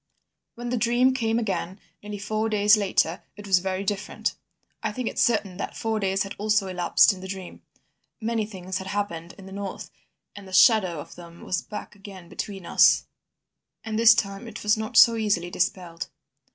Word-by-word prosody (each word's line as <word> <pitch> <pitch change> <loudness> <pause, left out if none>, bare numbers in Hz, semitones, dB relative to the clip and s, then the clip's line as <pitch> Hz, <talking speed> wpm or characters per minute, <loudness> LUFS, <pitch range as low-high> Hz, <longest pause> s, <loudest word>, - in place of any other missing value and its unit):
"When 240 +1 -6
the 250 - 0
dream 240 +3 +3
came 225 -3 0
again, 195 -4 -3 0.2
nearly 210 0 -6
four 215 +2 -2
days 210 0 +5
later, 190 -5 0
it 205 +1 -11
was 190 -2 +4
very 190 +1 -3
different. 205 +1 -2 0.5
I 220 - -1
think 245 +2 -4
it - - -3
certain 205 -6 +1
that - - -5
four 225 -1 -1
days 195 -1 0
had 195 - -7
also 210 -1 +2
elapsed 185 +2 +3
in 185 - -11
the 190 - -7
dream. 190 -1 -8 0.6
Many 225 -2 -1
things 185 -2 -5
had 190 - -7
happened 185 -4 -4
in 195 - -12
the 190 - -11
north, 200 0 -6 0.4
and 200 -1 -10
the 190 - -12
shadow 185 - +5
of - - -9
them 170 -1 -13
was 185 - -1
back 210 - -8
again 195 -3 -12
between 195 -1 -6
us, - - +5 0.8
and 220 0 -3
this 230 0 +8
time 200 +1 -3
it - - -8
was 210 0 +4
not 220 +2 -3
so 230 +2 +8
easily 200 -5 0
dispelled. 175 -4 -2
200 Hz, 190 wpm, -25 LUFS, 185-220 Hz, 0.8 s, this